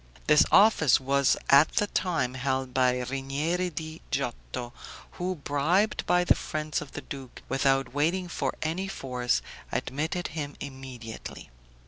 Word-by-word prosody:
This 150 0 +6
office 195 - +6
was 135 +1 +2
at 140 +3 +7
that 205 - 0
time 160 -9 0
held 130 0 -2
by 125 -1 +3
Rinieri 140 +8 -1
di 160 0 -7
Giotto, 125 -2 -3 0.4
who, 185 +1 -3
bribed 160 +8 +1
by 180 0 +4
the - - +5
friends 155 -1 -3
of 140 - -10
the - - -5
duke, 135 -3 -9
without 135 -1 +1
waiting 170 +6 +1
for 175 - -2
any 170 +5 -2
force, 125 -8 -1 0.3
admitted 160 +6 -2
him 145 -2 -5
immediately. 130 - -8
140 Hz, 135 wpm, -28 LUFS, 130-165 Hz, 0.4 s, at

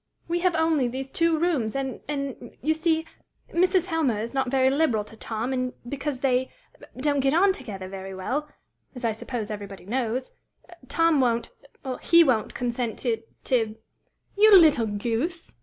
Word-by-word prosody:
We 340 +1 0
have 360 -1 +2
only 320 -5 +2
these 265 +2 -5
two 335 -1 +2
rooms, 300 -10 0
and 270 -1 -3
and 275 -4 -5
you 315 +3 +3
see 320 0 +1 0.5
Mrs. 365 0 +3
Helmer 315 - 0
is 230 +3 -4
not 265 -2 0
very 265 0 +3
liberal 270 -7 +2
to 210 - -14
Tom, 225 +3 -3
and 255 -1 -1
because 280 0 -4
they 260 -1 +1 0.5
don't 285 +2 +1
get 270 +2 +2
on 385 +3 +5
together 195 - -7
very 190 0 -7
well 275 +11 -3 0.5
as 250 -1 -5
I 230 - +2
suppose 220 0 -5
everybody 200 -3 -7
knows 245 +3 -2 0.6
Tom 330 0 +3
won't 235 -2 0 0.5
he 335 0 +6
won't 240 -8 +1
consent 240 -2 -2
to 230 -3 0 0.2
to 225 -4 +1 0.3
" - - -44
"You 425 -1 +9
little 300 -9 +5
goose!" 235 - -3
260 Hz, 165 wpm, -25 LUFS, 230-315 Hz, 0.6 s, You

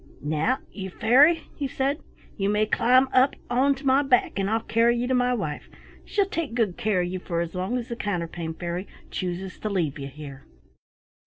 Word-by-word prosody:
"Now, 155 - +1
you 190 -2 -6
Fairy," 275 - +4
he 285 - -2
said, 270 +3 -1 0.4
"you 195 -1 0
may 210 +1 +2
climb 250 +4 +4
up 260 +2 +4 0.2
onto 270 +3 +2
my 265 +1 +5
back, 265 -4 +3
and 195 0 0
I'll 225 +1 +1
carry 230 +2 +3
you 240 - 0
to 260 - 0
my 250 0 +2
wife; 155 -10 -4 0.3
she'll 400 - +1
take 335 - -3
good 215 -7 +1
care 215 -6 +1
of 175 - -1
you 185 +1 -4
for 170 -2 -3
as 170 -1 -3
long 185 +7 -1
as 240 -1 -4
the 235 - -3
Counterpane 170 -6 -3
Fairy 175 +2 -4 0.2
chooses 185 0 -4
to 215 - -3
leave 165 -8 -1
you 135 - -5
here." 140 -1 -10
215 Hz, 195 wpm, -25 LUFS, 175-255 Hz, 0.4 s, my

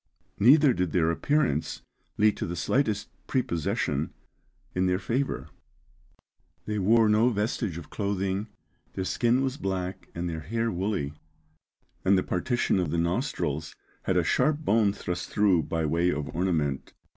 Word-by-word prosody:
Neither 140 +5 +6
did 90 -5 -1
their 85 -2 +3
appearance 140 - 0 0.3
lead 105 0 +4
to - - -3
the 85 - -4
slightest 110 - 0 0.2
prepossession 85 - -1 0.6
in 90 0 +1
their 90 0 +2
favour. 130 +7 -2 1.2
They 105 -1 -2
wore 110 +3 +4
no 110 +3 +4
vestige 105 -4 -1
of 85 - -10
clothing; 100 0 -1 0.5
their 95 - -2
skin 120 +6 +2
was 135 0 -2
black 95 -3 -3
and 85 +1 -2
their 80 -2 -3
hair 115 +8 -1
woolly; 90 -6 -2 0.9
and 95 +1 +4
the 95 - +1
partition 100 +2 0
of 90 -4 0
the 85 - -1
nostrils 85 - -1 0.3
had 95 - 0
a 90 - +3
sharp 140 - +2
bone 110 -4 +4
thrust 90 -2 -4
through 100 -5 +3
by 80 0 -2
way 85 +3 +2
of 75 -3 -3
ornament. 80 -6 -1
95 Hz, 145 wpm, -27 LUFS, 85-115 Hz, 1.2 s, Neither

